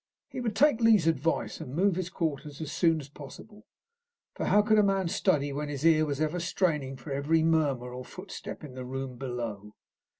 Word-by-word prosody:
He - - -6
would 225 -4 -2
take 245 0 +4
Lee's 220 -7 +5
advice, 165 0 0
and 130 - -7
move 190 +2 +3
his 185 -1 -3
quarters 150 -5 -3
as 155 -2 -5
soon 165 -3 +2
as 140 - -9
possible, 205 +10 -12 0.7
for - - -3
how 210 - +5
could 215 0 +4
a - - +5
man 195 -2 +1
study 145 -3 +1
when 145 +1 -3
his 145 +1 -4
ear 155 -1 +5
was 140 -1 -2
ever 155 +3 0
straining 155 -6 0
for 130 +3 -9
every 150 +4 +2
murmur 145 -7 +1
or 125 0 -6
footstep 185 +4 -8
in 145 -4 -9
the 130 0 -6
room 130 0 -5
below? 115 -5 -5
155 Hz, 200 wpm, -29 LUFS, 135-185 Hz, 0.7 s, Lee's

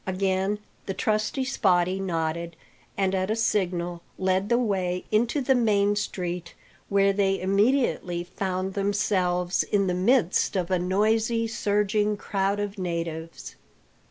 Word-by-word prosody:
Again 190 +1 0 0.3
the 195 - -3
trusty 215 +4 0
Spottie 190 -7 +1
nodded, 170 -2 -2 0.4
and 195 -1 +1
at 190 0 0
a 220 - +1
signal 175 -6 -1 0.2
led 190 +2 0
the 235 - +4
way 185 -6 -1
into 235 +6 +2
the 265 +1 +3
main 205 -4 +2
street, 180 -4 -4 0.3
where 200 0 +3
they 195 -1 +1
immediately 195 -3 +1
found 185 +1 -3
themselves 185 -3 +1
in 200 -1 +1
the 180 - 0
midst 195 +1 +2
of 185 -1 -1
a 185 - +2
noisy, 220 +5 +1
surging 210 -1 0
crowd 200 0 -1
of 205 0 -4
natives. 165 -2 -5
195 Hz, 130 wpm, -26 LUFS, 180-210 Hz, 0.4 s, the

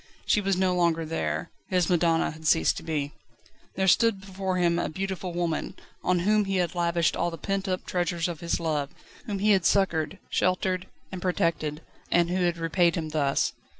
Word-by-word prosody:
She 210 - +3
was 195 -2 +1
no 185 -1 +2
longer 170 -2 +1
there. 80 - -2 0.2
His 180 -2 +1
madonna 170 -2 +2
had 160 0 -7
ceased 80 - +4
to - - -5
be. 150 -3 -2 0.6
There 190 0 +1
stood 225 +2 +4
before 190 -1 -3
him 170 -1 +2
a - - -1
beautiful 190 +1 -4
woman, 170 -2 -2 0.3
on 180 -1 +2
whom 210 +2 +3
he 195 0 -1
had 175 -3 0
lavished 170 -1 +1
all 175 - 0
the 165 - -7
pent 195 +2 -2
up 185 -1 -2
treasures 175 -2 -1
of 170 -3 -5
his 170 - -1
love, 150 -4 -1 0.4
whom 205 -2 -2
he 210 +2 +3
had 190 -3 +4
succoured, 185 -2 +1
sheltered, 185 0 0 0.2
and 185 -2 -6
protected, 165 -4 -1 0.3
and 175 0 +3
who 185 0 +1
had 175 -1 +1
repaid 170 +1 +2
him 160 -3 -3
thus. 145 -3 +1
175 Hz, 190 wpm, -27 LUFS, 165-190 Hz, 0.6 s, ceased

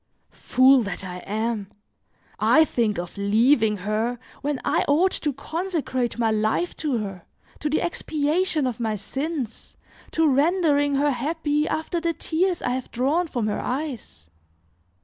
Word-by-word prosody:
Fool 260 +1 +4
that 200 -3 -4
I 180 -1 -6
am! 215 +2 -3 0.7
I 315 0 +5
think 225 -7 0
of 175 +3 -6
leaving 220 +2 +3
her 215 +5 -1 0.2
when 290 -2 -1
I - - +2
ought 340 +7 +4
to 295 - -1
consecrate 285 -4 -2
my 225 -2 +2
life 215 +11 0
to 290 -6 -1
her, 195 -5 -6 0.3
to 300 - -1
the 305 - +1
expiation 315 -1 0
of 250 -2 -2
my 220 -2 -1
sins, 270 - -5 0.4
to 320 -1 +3
rendering 290 0 +3
her 290 +1 +2
happy 295 +3 -1
after 320 +2 -2
the 335 0 0
tears 345 +2 -1
I - - 0
have 255 0 -3
drawn 290 +9 +1
from 245 -7 -2
her 210 - -1
eyes! 250 - -5
270 Hz, 150 wpm, -24 LUFS, 220-315 Hz, 0.7 s, I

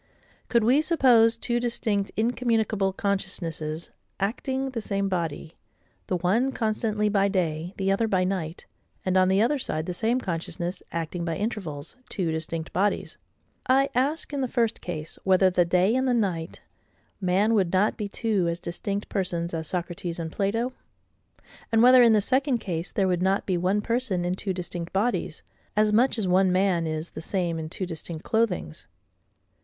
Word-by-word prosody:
Could 235 -2 +3
we 255 +7 +4
suppose 245 -8 +4
two 240 +1 -1
distinct 230 -4 -1
incommunicable 225 -4 +1
consciousnesses 170 -5 -3 0.3
acting 265 +6 -2
the 235 -3 -3
same 200 -1 -1
body, 165 -3 -3 0.5
the 185 - 0
one 210 +10 +1
constantly 215 -1 0
by 200 -1 +3
day, 175 -2 -1
the 195 0 +1
other 225 +3 +1
by 185 -3 +2
night; 180 -3 -3 0.4
and, 185 0 +1
on 185 0 +5
the 190 +3 +3
other 285 +4 +1
side, 155 -9 -2
the 180 - -3
same 230 +7 +1
consciousness, 175 -2 -4
acting 170 +1 -3
by 165 -1 -2
intervals, 185 -9 -4
two 180 -5 -1
distinct 160 0 -4
bodies: 200 +3 0 0.5
I 270 +2 +4
ask, 285 +5 0
in 280 - -1
the 260 - 0
first 235 -2 0
case, 160 -3 -5
whether 190 0 +4
the 175 -1 +3
day 180 +5 +3
and 260 0 +1
the 250 - +3
night—man 190 +1 -2
would 190 -6 +2
not 195 +3 +2
be 210 - -3
two 200 -3 0
as 170 0 -2
distinct 195 +4 -4
persons 175 -3 -2
as 160 -1 -3
Socrates 175 0 -3
and 165 -1 -4
Plato? 225 +7 -1 1.0
And 225 0 +4
whether, 255 +1 +8
in 235 -2 +6
the 210 - +4
second 260 +3 +2
case, 175 -5 -4
there 195 -2 +1
would 180 -1 0
not 190 +2 +1
be 185 - 0
one 185 +4 +1
person 225 -6 -1
in 175 - 0
two 190 +1 -3
distinct 175 -2 -5
bodies, 195 -5 -1 0.3
as 210 0 +3
much 240 +3 +3
as 210 -4 -1
one 185 +1 +4
man 185 -3 +2
is 155 +1 -3
the - - -7
same 170 -2 -1
in 155 0 -5
two 185 - -3
distinct 165 -1 -6
clothings? 215 - -1
195 Hz, 170 wpm, -26 LUFS, 175-225 Hz, 1.0 s, whether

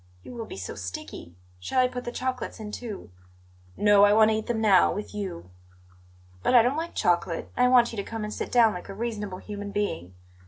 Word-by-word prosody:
You - - -10
will 230 -2 -6
be - - -8
so 95 - -6
sticky! 90 -2 -8 0.2
Shall 90 - -1
I 255 - +5
put 250 0 -6
the 240 - -3
chocolates 255 0 -4
in, 210 -1 -7
too?" 215 - -7 0.7
"No, 205 -1 +5
I 205 0 +6
want 220 0 +5
to - - +1
eat 220 - -5
them 235 -2 -1
now, 200 -5 +5
with 205 +1 -6
you." 90 - -6 0.9
"But 250 - +2
I 235 - +8
don't 250 +4 +1
like 330 +2 -4
chocolate, 175 -3 0
and 250 - +4
I - - +3
want 245 -2 +5
you - - -7
to 200 - -2
come 225 -1 -4
and 210 0 -4
sit - - -5
down 230 -3 +5
like 180 - -8
a 195 - -7
reasonable 210 -4 -4
human 205 +1 -7
being. 145 - -3
210 Hz, 230 wpm, -26 LUFS, 195-235 Hz, 0.9 s, I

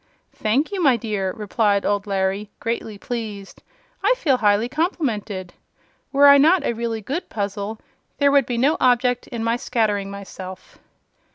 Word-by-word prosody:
"Thank 245 - 0
you, 390 -2 -2
my 270 -7 +4
dear," 205 -4 -2
replied 205 0 0
old 205 0 0
Larry, 195 +1 -1
greatly 230 -2 -3
pleased. 210 -3 -6 0.4
"I - - +4
feel 285 - +2
highly 210 0 +2
complimented. 235 - -2 0.6
Were 280 0 +5
I 280 0 +8
not 325 +5 +5
a - - 0
really 230 -1 -3
good 280 - -4
puzzle, 205 +1 -4 0.4
there 285 -1 +4
would 280 -3 +4
be 245 - -2
no 280 +7 +2
object 245 0 +2
in 235 -2 -5
my 230 +1 +1
scattering 210 -5 -1
myself." 190 -2 -9
225 Hz, 155 wpm, -22 LUFS, 205-260 Hz, 0.6 s, I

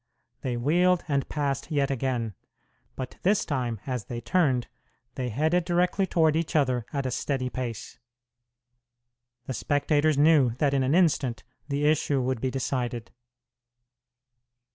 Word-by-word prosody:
They 125 -2 -2
wheeled 175 +8 +2
and 140 -3 -1
passed 140 -2 -2
yet 140 -3 +1
again; 125 -4 -1 0.6
but 130 -1 -6
this 200 +2 +2
time, 125 -6 -2
as 125 -5 -3
they 120 - -5
turned, 125 - +1 0.5
they 125 -1 -3
headed 160 +9 +1
directly 180 +2 +1
toward 160 -3 +3
each 165 +1 -2
other 125 -6 +1
at 140 -2 -2
a 130 - -1
steady 130 0 -2
pace. 120 -4 -5 1.5
The 130 - -4
spectators 145 +4 +1
knew 145 -6 +4
that 140 +1 +1
in 135 - +2
an 130 +4 +2
instant 145 -9 +2 0.2
the 145 0 -1
issue 150 -2 +2
would 130 -2 -1
be 130 - 0
decided. 125 -3 -3
140 Hz, 140 wpm, -27 LUFS, 125-155 Hz, 1.5 s, knew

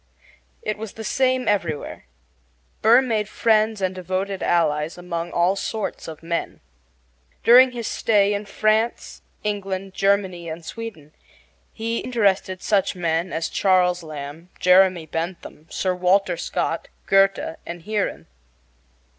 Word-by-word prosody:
It 215 0 -3
was 220 -2 -6
the 220 - -8
same 255 +1 +1
everywhere. 170 -8 -2 0.8
Burr 235 +4 +6
made 215 -4 -1
friends 215 -2 +2
and 185 0 0
devoted 185 +1 -3
allies 160 -2 +1
among 175 -1 -4
all 175 +3 +2
sorts 215 +1 -4
of 160 0 -9
men. 170 0 -3 0.8
During 255 +2 +8
his 235 -2 -4
stay 205 -2 +2
in 205 0 -4
France, 215 +3 0 0.2
England, 195 -2 -3
Germany, 190 -4 0
and 160 +1 -7
Sweden 180 -11 -8 0.6
he 230 +1 -3
interested 195 -6 0
such 200 -3 +1
men 170 0 -1
as 160 0 -1
Charles 180 -2 +2
Lamb, 155 +2 -8
Jeremy 185 -2 +4
Bentham, 165 -1 -6
Sir 185 -1 -1
Walter 180 0 +2
Scott, - - -2 0.2
Goethe, 195 -4 +2
and 170 -1 -7
Heeren. 210 +1 -2
190 Hz, 125 wpm, -23 LUFS, 170-215 Hz, 0.8 s, During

